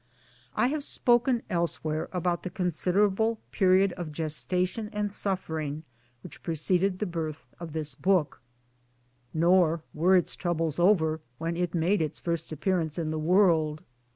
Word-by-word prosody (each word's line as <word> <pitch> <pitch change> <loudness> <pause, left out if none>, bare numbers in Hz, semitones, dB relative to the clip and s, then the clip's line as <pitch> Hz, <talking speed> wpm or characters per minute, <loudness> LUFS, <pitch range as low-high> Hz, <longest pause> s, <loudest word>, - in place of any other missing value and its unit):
I - - +2
have 300 0 -2
spoken 240 -2 +2
elsewhere 160 -4 -2
about 175 -1 -1
the 185 - -5
considerable 195 +6 +1
period 190 0 +3
of 175 -4 -6
gestation 180 +7 -1
and 210 -1 -2
suffering 160 -7 -2 0.4
which - - -10
preceded 180 +4 +1
the 210 - -2
birth 160 -6 -4
of 170 -3 -7
this 155 -3 -2
book; 180 -1 +1 0.9
nor 170 -1 +3
were 175 +5 +3
its 180 - +1
troubles 165 -3 -1
over 160 -4 +3 0.2
when 165 +1 -3
it 175 0 -2
made 175 +3 +2
its 155 -2 -2
first 170 -2 -3
appearance 160 0 -1
in 160 -2 -2
the 155 - -2
world. 160 -3 +3
175 Hz, 140 wpm, -28 LUFS, 160-190 Hz, 0.9 s, period